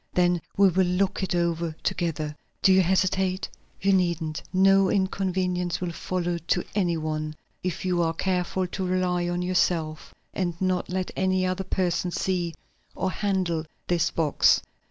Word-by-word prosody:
Then 175 -1 +3 0.2
we 200 -1 +6
will 185 +1 +2
look 190 +3 0
it 190 -1 -1
over 170 -2 0
together. 155 -3 -1 0.3
Do 190 - +7
you 190 - +6
hesitate? 185 +1 +1 0.3
You 195 +1 +3
needn't; 170 -4 0
no 195 0 +5
inconvenience 185 -2 0
will 180 -1 -2
follow 175 0 -2
to 175 +2 0
any 175 -5 +1
one, 155 -1 -3 0.3
if 180 0 -3
you 180 -1 +1
are 165 -1 +1
careful 185 +1 0
to 190 +2 -4
rely 180 -1 0
on 175 0 -1
yourself 170 -3 0 0.2
and 175 -3 -2
not 185 -1 0
let 185 0 -2
any 185 0 +1
other 185 +1 -1
person 180 -1 0
see 175 -2 -1 0.4
or 190 - -1
handle 185 -5 0 0.2
this 175 -1 +1
box." 155 -3 +3
180 Hz, 155 wpm, -26 LUFS, 170-185 Hz, 0.4 s, Do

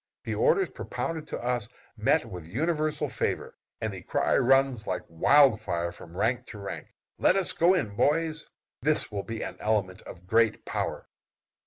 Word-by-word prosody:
The - - -3
orders 470 -5 +3
propounded 160 -2 -4
to - - -4
us 120 -3 -1 0.3
meet - - +2
with 90 -3 -8
universal 155 - -1
favor, 115 - -3 0.2
and 110 -2 -3
the 95 - -7
cry - - +1
runs 135 -3 +3
like - - -2
wild 115 - +5
fire 85 -4 -2
from 85 0 -12
rank 120 +5 0
to 105 - -9
rank, 100 -1 -6 0.3
"let - - +4
us 195 -2 +3
go 175 +3 +4
in, 105 - -2
boys!" 160 +4 +1 0.3
This 150 -1 +1
will 100 -1 -2
be 115 +3 -5
an - - -6
element 105 -3 0
of 90 0 -12
great 115 +3 +2
power. - - -3
120 Hz, 170 wpm, -28 LUFS, 100-155 Hz, 0.3 s, wild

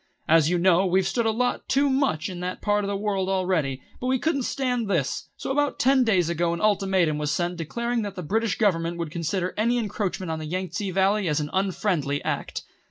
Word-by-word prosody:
"As 160 -1 +5
you 180 - +2
know, 180 +1 +4
we've 185 +1 +2
stood 235 -2 0
a - - +4
lot 245 +3 -1
too 280 +1 +3
much 265 - +1
in 180 -3 -6
that 180 +1 -4
part 205 0 +1
of - - -2
the 200 - -1
world 195 -2 -1
already, 180 -9 0 0.2
but 250 - -3
we 260 0 +2
couldn't 280 +1 0
stand 250 -3 -1
this; 165 -9 -1
so - - -4
about 290 +1 +1
ten 265 0 +4
days 190 -8 +2
ago 170 0 0
an 170 - -3
ultimatum 190 -7 +2
was 150 -1 -1
sent 175 +3 -1
declaring 235 +8 -2
that 205 -2 -5
the 180 - -5
British 215 +4 0
Government 170 -5 +1
would 165 -3 -4
consider 175 +3 -2
any 235 +3 +2
encroachment 200 -5 -2
on 160 - -3
the 155 - -5
Yang 185 +3 -3
tse 200 +4 -3
Valley 195 +1 +2
as 150 -1 +1
an 150 -1 -4
unfriendly 185 -7 0
act. - - -3
190 Hz, 225 wpm, -25 LUFS, 170-220 Hz, 0.2 s, As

